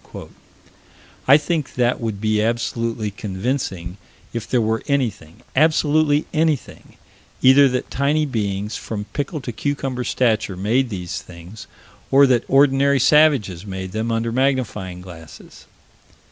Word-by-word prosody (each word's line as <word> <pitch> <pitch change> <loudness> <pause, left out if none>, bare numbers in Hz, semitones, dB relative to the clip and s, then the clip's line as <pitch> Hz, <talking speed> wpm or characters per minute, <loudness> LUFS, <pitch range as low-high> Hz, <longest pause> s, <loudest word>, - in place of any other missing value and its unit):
I 140 +2 +8
think 155 -1 -3
that 120 0 +1
would 110 -3 -3
be 110 0 +1
absolutely 115 -1 -2
convincing, 95 -3 -4 0.4
if 115 -2 -4
there 125 - +2
were 110 0 0
anything 110 - -2
absolutely 155 -1 +3
anything 155 -3 -2 0.5
either 135 +2 +7
that 125 0 -3
tiny 145 +3 +1
beings, 105 -5 -3
from 105 -2 -5
pickle 145 +1 -3
to 125 - -5
cucumber 135 0 -3
stature, 110 -6 0
made 120 +7 +1
these 90 -5 -5
things, 90 +5 -12 0.4
or 140 +1 +6
that 125 -3 +2
ordinary 140 0 +4
savages 135 - +3
made 95 -2 -6
them 110 +3 -2
under 115 0 -1
magnifying 115 -8 -1
glasses. 85 -3 -13
120 Hz, 125 wpm, -21 LUFS, 105-140 Hz, 0.5 s, I